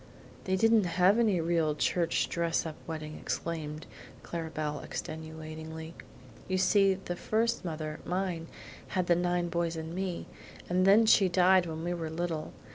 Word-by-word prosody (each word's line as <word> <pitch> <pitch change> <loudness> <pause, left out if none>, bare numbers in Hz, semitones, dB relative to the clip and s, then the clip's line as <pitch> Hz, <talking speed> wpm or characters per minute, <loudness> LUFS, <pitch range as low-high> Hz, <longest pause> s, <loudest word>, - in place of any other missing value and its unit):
"They 190 - +1
didn't 225 +1 +4
have 190 +5 +5
any 210 -6 +3
real 165 -2 +1
church 170 +2 +1
dress 170 -1 0
up 160 -2 -5
wedding," 155 -1 -5
explained 155 -2 -4 0.4
Clara 165 -1 -4
Belle 150 -2 -3
extenuatingly. 160 0 -7 0.5
"You 185 - 0
see 195 +1 +4
the 185 -2 -5
first 225 +5 0
mother, 155 -3 -4
mine, 180 -3 -2 0.5
had 180 - +2
the 175 - +4
big 175 0 0
boys 170 -1 0
and 160 0 -5
me, 185 -1 -3 0.4
and 185 +1 +2
then 210 +3 +7
she 200 -3 +5
died 180 0 +4
when 160 0 -5
we 175 +1 -1
were 165 -2 -4
little. 160 -1 -3
170 Hz, 155 wpm, -30 LUFS, 160-185 Hz, 0.5 s, then